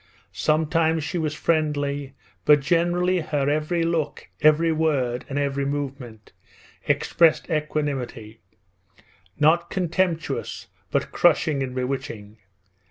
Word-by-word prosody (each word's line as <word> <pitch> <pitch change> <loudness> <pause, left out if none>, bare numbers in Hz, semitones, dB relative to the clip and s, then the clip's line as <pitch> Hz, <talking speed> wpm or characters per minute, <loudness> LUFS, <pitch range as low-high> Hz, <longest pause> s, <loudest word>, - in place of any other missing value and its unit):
Sometimes 160 +1 +1
she 175 +4 -3
was 155 -1 -2
friendly, 145 -4 -1 0.3
but 150 -1 +6
generally 175 +4 +1
her 145 -3 -1
every 155 +3 0
look, 165 -3 -2
every 155 +2 +4
word, 140 -6 0
and 140 - -3
every 140 -1 0
movement 135 -6 -5 0.6
expressed 165 -2 +3
equanimity 140 -8 -3 1.0
not 170 +3 +3
contemptuous, 175 -2 -2 0.2
but - - -1
crushing 155 -4 +2
and 130 -1 -4
bewitching. 120 -5 -4
150 Hz, 100 wpm, -24 LUFS, 140-165 Hz, 1.0 s, but